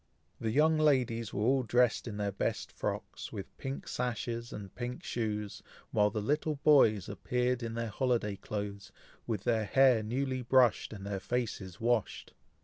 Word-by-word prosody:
The 110 - -1
young 155 +6 +4
ladies 125 -7 +2
were 105 - -2
all 130 +3 +3
dressed 125 +1 +2
in 105 -3 -5
their 100 -1 -1
best 100 - -2
frocks, - - -4
with - - -7
pink 135 +1 -5
sashes, 120 -1 -3
and 100 -3 -8
pink 125 0 -5
shoes; 105 -3 -3 0.3
while 105 -1 +3
the 105 -1 -3
little 150 +5 0
boys 110 - +5
appeared 125 0 -1
in 115 -1 -4
their 115 -1 -2
holiday 115 -3 0
clothes, 100 0 -5 0.4
with 110 -5 -2
their 110 -2 +1
hair 130 0 +5
newly 130 +4 -2
brushed, 125 -1 +3
and 100 -3 -8
their 100 -1 -3
faces 105 -5 -3
washed. 115 -2 0
115 Hz, 160 wpm, -32 LUFS, 105-125 Hz, 0.4 s, boys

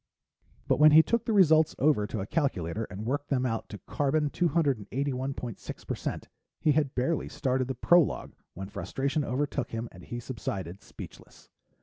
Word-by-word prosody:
But - - +2
when 150 0 +8
he 160 +1 +9
took 235 +4 0
the - - 0
results 160 -6 +5
over 135 -7 +3
to 105 - -4
a - - -3
calculator 110 - -1
and 105 +2 -7
worked 145 +4 -2
them 130 -2 +1
out 115 -2 -2
to 105 - -7
carbon 145 - 0
281.6% 135 - -2 0.4
he 155 - +3
had 145 -2 +1
barely 135 +5 0
started 130 -1 -1
the 130 - -3
prologue 175 +6 +3 0.2
when 95 +2 -6
frustration 140 +8 -2
overtook 140 +1 -2
him 115 +1 -4
and 90 - -13
he 120 - -6
subsided, 100 -7 -5
speechless. - - -12
135 Hz, 155 wpm, -29 LUFS, 115-150 Hz, 0.4 s, he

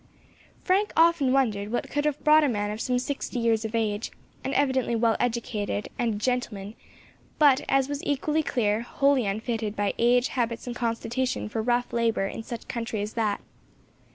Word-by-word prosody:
Frank 395 +3 +1
often 325 -5 +4
wondered 215 -6 +1
what 240 - -2
could 290 0 0
have 300 -1 -1
brought 305 +1 +6
a 290 - +3
man 205 -3 -1
of 215 +1 -5
some 250 -1 0
sixty 270 0 -3
years 230 -2 +2
of 220 +1 -4
age, 215 -1 -1 0.3
and 265 - -2
evidently 260 -4 +1
well 230 0 +2
educated, 225 -4 -2
and 230 -3 +1
a - - -4
gentleman, 215 -3 -2 0.6
but, 285 -4 +5
as 270 -1 +3
was 285 0 -4
equally 300 +2 0
clear, 220 -7 0
wholly 270 -1 +2
unfitted 220 +1 -2
by 205 -1 0
age, 245 +1 +3
habits, 235 -3 -2
and 245 -1 -5
constitution 240 +2 -2
for 220 +1 -2
rough 245 +1 0
labour 230 -4 +1
in 195 - -5
such 230 +1 -7
a - - -30
country 230 -2 -3
as 210 +2 -4
that. 215 -3 0
235 Hz, 180 wpm, -26 LUFS, 220-265 Hz, 0.6 s, brought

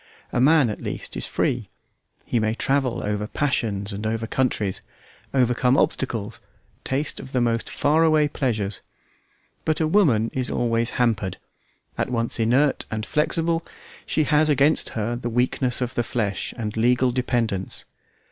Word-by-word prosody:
A 120 - +2
man, 145 -3 +5
at - - -7
least, - - -5
is - - -2
free; - - -1 0.6
he 120 - 0
may 110 0 0
travel 135 -1 0
over 105 0 -2
passions 110 -7 -1
and 105 +2 -3
over 115 0 -2
countries, 110 -6 -1 0.5
overcome 125 0 +2
obstacles, 115 -4 -1 0.4
taste 140 +3 -1
of 130 - -10
the 130 - +2
most 115 -1 0
far 155 +3 +2
away 155 -2 +4
pleasures. 110 -9 -2 0.8
But 155 - 0
a 160 - +2
woman 140 - +3
is 130 -1 -1
always 115 -1 0
hampered. 105 -6 0 0.6
At - - 0
once 115 -1 0
inert 130 +6 +2
and 110 -1 -3
flexible, 165 +2 0 0.4
she 155 - 0
has 150 0 +3
against 145 +2 +3
her 115 +2 -1
the 120 0 -4
weakness 125 +2 +1
of 125 0 -2
the - - 0
flesh 105 -5 -2
and 110 -2 -4
legal 125 +2 +3
dependence. 120 -6 -1
120 Hz, 150 wpm, -23 LUFS, 110-140 Hz, 0.8 s, man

